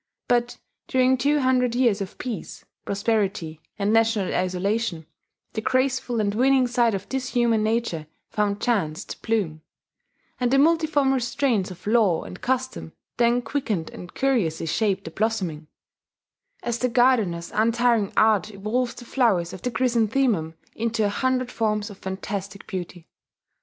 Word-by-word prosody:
But 240 Hz, 0 st, +1 dB, 0.3 s
during 260 Hz, 0 st, +3 dB
two 285 Hz, +3 st, +2 dB
hundred 250 Hz, -2 st, +2 dB
years 235 Hz, -5 st, +2 dB
of 195 Hz, -, -6 dB
peace, 245 Hz, -5 st, -6 dB, 0.2 s
prosperity, 200 Hz, -6 st, -1 dB, 0.2 s
and 205 Hz, +1 st, +1 dB
national 225 Hz, -3 st, +2 dB
isolation, 185 Hz, 0 st, -1 dB, 0.5 s
the 220 Hz, -, -2 dB
graceful 255 Hz, -1 st, 0 dB
and 205 Hz, -1 st, +1 dB
winning 260 Hz, +3 st, +4 dB
side 240 Hz, -3 st, +2 dB
of 195 Hz, 0 st, -6 dB
this 265 Hz, -1 st, -2 dB
human 235 Hz, -3 st, +2 dB
nature 215 Hz, -8 st, -1 dB, 0.2 s
found 205 Hz, -1 st, 0 dB
chance 190 Hz, -11 st, 0 dB
to -, -, -9 dB
bloom; 190 Hz, -9 st, -1 dB, 0.8 s
and 250 Hz, -1 st, +1 dB
the 270 Hz, -, +3 dB
multiform 300 Hz, -2 st, +3 dB
restraints 255 Hz, -5 st, 0 dB
of 185 Hz, -, -11 dB
law 210 Hz, -6 st, +3 dB
and 180 Hz, -, -10 dB
custom 260 Hz, -9 st, -2 dB, 0.2 s
then 240 Hz, +1 st, +3 dB
quickened 225 Hz, -, -2 dB
and 180 Hz, -, -10 dB
curiously 210 Hz, -13 st, +1 dB
shaped 195 Hz, +4 st, 0 dB
the 165 Hz, -, -7 dB
blossoming, 185 Hz, -8 st, -2 dB, 1.0 s
as 240 Hz, -1 st, -2 dB
the 250 Hz, -, +1 dB
gardener's 230 Hz, -9 st, +2 dB
untiring 230 Hz, -1 st, +2 dB
art 215 Hz, -1 st, +4 dB
evolves 215 Hz, +5 st, -2 dB
the 240 Hz, -, -10 dB
flowers 200 Hz, -10 st, +1 dB
of 185 Hz, -, -8 dB
the 250 Hz, -, -1 dB
chrysanthemum 235 Hz, -8 st, +1 dB, 0.2 s
into 225 Hz, -1 st, 0 dB
a -, -, +2 dB
hundred 255 Hz, +3 st, 0 dB
forms 210 Hz, -1 st, -1 dB
of 195 Hz, -, -13 dB
fantastic 195 Hz, +1 st, -5 dB
beauty.... 175 Hz, -2 st, -6 dB
225 Hz, 145 wpm, -24 LUFS, 195-250 Hz, 1.0 s, winning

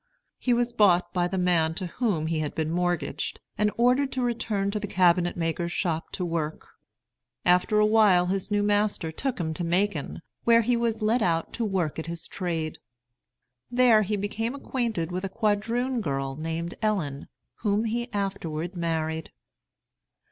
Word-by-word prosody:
He 250 Hz, -, 0 dB
was 240 Hz, 0 st, +2 dB
bought 180 Hz, -6 st, +4 dB
by 175 Hz, -1 st, +1 dB
the 190 Hz, +1 st, -3 dB
man 170 Hz, -3 st, +2 dB
to 185 Hz, -, -4 dB
whom 180 Hz, -4 st, -1 dB
he 160 Hz, 0 st, -1 dB
had 150 Hz, -1 st, -3 dB
been 160 Hz, 0 st, -1 dB
mortgaged, 175 Hz, 0 st, -1 dB, 0.2 s
and 210 Hz, 0 st, +2 dB
ordered 250 Hz, +3 st, +3 dB
to 255 Hz, -, -1 dB
return 215 Hz, -4 st, -1 dB
to 210 Hz, -, -2 dB
the 205 Hz, -, -4 dB
cabinet 180 Hz, -2 st, +3 dB
maker's 170 Hz, +1 st, -1 dB
shop 165 Hz, -3 st, -2 dB
to 180 Hz, -, -2 dB
work. 160 Hz, -2 st, -3 dB, 0.8 s
After 180 Hz, +4 st, +4 dB
a 210 Hz, -, +5 dB
while 210 Hz, -5 st, +5 dB
his 190 Hz, +1 st, -2 dB
new 205 Hz, -1 st, +1 dB
master 205 Hz, -5 st, +1 dB
took 255 Hz, -, -3 dB
him 160 Hz, -2 st, -1 dB
to 175 Hz, -, -4 dB
Macon, 170 Hz, -3 st, -1 dB, 0.2 s
where 230 Hz, 0 st, +5 dB
he 245 Hz, +2 st, +2 dB
was 230 Hz, -2 st, -1 dB
let 225 Hz, +3 st, +2 dB
out 165 Hz, -4 st, 0 dB
to 235 Hz, -, -2 dB
work 185 Hz, -8 st, -1 dB
at 160 Hz, -, -5 dB
his 170 Hz, 0 st, -6 dB
trade. 165 Hz, -4 st, -3 dB, 0.9 s
There 245 Hz, -3 st, +5 dB
he 210 Hz, +1 st, 0 dB
became 225 Hz, +5 st, -2 dB
acquainted 230 Hz, -, -2 dB
with 185 Hz, +1 st, -3 dB
a 195 Hz, -, -2 dB
quadroon 230 Hz, +4 st, 0 dB
girl 135 Hz, -4 st, -2 dB
named 165 Hz, +3 st, -3 dB
Ellen, 170 Hz, -11 st, -1 dB, 0.3 s
whom 210 Hz, 0 st, +1 dB
he 240 Hz, +2 st, -2 dB
afterward 185 Hz, -4 st, -3 dB
married. 160 Hz, -2 st, -2 dB
190 Hz, 170 wpm, -26 LUFS, 165-220 Hz, 0.9 s, a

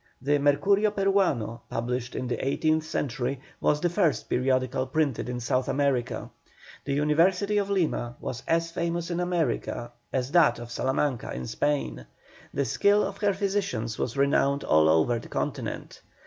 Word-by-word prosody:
The 145 Hz, +3 st, +1 dB
Mercurio 195 Hz, +9 st, +3 dB
Peruano, 195 Hz, -, +1 dB
published 120 Hz, +1 st, -3 dB
in 130 Hz, -, -3 dB
the 120 Hz, -, -2 dB
eighteenth 155 Hz, +3 st, +1 dB
century, 135 Hz, -3 st, -2 dB, 0.2 s
was 150 Hz, -, +2 dB
the 175 Hz, -, +1 dB
first 170 Hz, -, +1 dB
periodical 130 Hz, 0 st, +1 dB
printed 140 Hz, -3 st, 0 dB
in 125 Hz, 0 st, -3 dB
South 125 Hz, +2 st, 0 dB
America. 130 Hz, -4 st, 0 dB, 0.5 s
The 140 Hz, -, -1 dB
University 180 Hz, +8 st, +2 dB
of 200 Hz, -1 st, -2 dB
Lima 155 Hz, -11 st, 0 dB
was 125 Hz, 0 st, -5 dB
as 165 Hz, 0 st, +1 dB
famous 170 Hz, 0 st, -2 dB
in 175 Hz, -, -1 dB
America 170 Hz, -8 st, -1 dB, 0.2 s
as 130 Hz, 0 st, -1 dB
that 165 Hz, -8 st, +5 dB
of 120 Hz, 0 st, -9 dB
Salamanca 130 Hz, 0 st, -1 dB
in 65 Hz, -, -5 dB
Spain; 65 Hz, -, -2 dB, 0.4 s
the 140 Hz, -, -1 dB
skill 205 Hz, -, +3 dB
of 195 Hz, 0 st, -4 dB
her 200 Hz, -2 st, +2 dB
physicians 190 Hz, -, -2 dB
was 125 Hz, +2 st, -2 dB
renowned 140 Hz, 0 st, +2 dB
all 80 Hz, 0 st, +4 dB
over 80 Hz, +10 st, +3 dB
the -, -, -11 dB
continent. -, -, -4 dB
140 Hz, 155 wpm, -27 LUFS, 125-175 Hz, 0.5 s, that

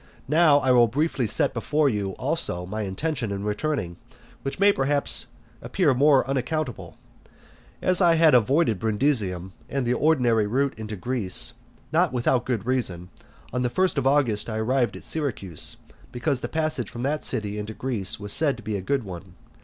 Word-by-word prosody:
Now 155 Hz, 0 st, +5 dB
I 130 Hz, -2 st, +2 dB
will 120 Hz, -2 st, +6 dB
briefly 135 Hz, 0 st, 0 dB
set -, -, +1 dB
before 150 Hz, 0 st, +1 dB
you, 100 Hz, -6 st, -1 dB
also, 90 Hz, 0 st, -1 dB
my 105 Hz, +4 st, -4 dB
intention 115 Hz, +4 st, -2 dB
in 100 Hz, 0 st, -4 dB
returning, 105 Hz, -, -2 dB, 0.4 s
which 135 Hz, -, -4 dB
may 200 Hz, +1 st, +6 dB
perhaps 140 Hz, -1 st, +1 dB, 0.3 s
appear 165 Hz, -8 st, +1 dB
more 135 Hz, 0 st, +4 dB
unaccountable. 135 Hz, 0 st, -3 dB, 0.9 s
As 185 Hz, +1 st, +3 dB
I 170 Hz, -2 st, +5 dB
had 160 Hz, -1 st, +5 dB
avoided 125 Hz, -, +3 dB
Brundusium, 105 Hz, -6 st, -1 dB, 0.2 s
and 135 Hz, -2 st, -1 dB
the 120 Hz, -, +1 dB
ordinary 125 Hz, -8 st, +2 dB
route 135 Hz, +5 st, 0 dB
into 110 Hz, -1 st, -6 dB
Greece, 120 Hz, +1 st, -1 dB, 0.4 s
not 170 Hz, +1 st, +2 dB
without 125 Hz, 0 st, +1 dB
good 115 Hz, -5 st, -2 dB
reason, 95 Hz, -9 st, -2 dB, 0.4 s
on 125 Hz, -, 0 dB
the 125 Hz, -, +1 dB
first 185 Hz, +7 st, +1 dB
of 135 Hz, -2 st, 0 dB
August 125 Hz, -7 st, +2 dB
I 110 Hz, -, -3 dB
arrived 120 Hz, -2 st, 0 dB
at 95 Hz, -, -9 dB
Syracuse, 115 Hz, -, -3 dB, 0.3 s
because 125 Hz, +1 st, -1 dB
the -, -, -3 dB
passage 155 Hz, -8 st, -1 dB
from 120 Hz, -, -6 dB
that 145 Hz, +1 st, -1 dB
city 105 Hz, -1 st, -2 dB
into 105 Hz, +1 st, -6 dB
Greece 115 Hz, -9 st, -2 dB
was 100 Hz, 0 st, -3 dB
said 145 Hz, -5 st, +1 dB
to 120 Hz, -, -12 dB
be 110 Hz, -, -3 dB
a -, -, -5 dB
good 135 Hz, +6 st, -1 dB
one. 90 Hz, -1 st, -9 dB
125 Hz, 175 wpm, -25 LUFS, 105-145 Hz, 0.9 s, will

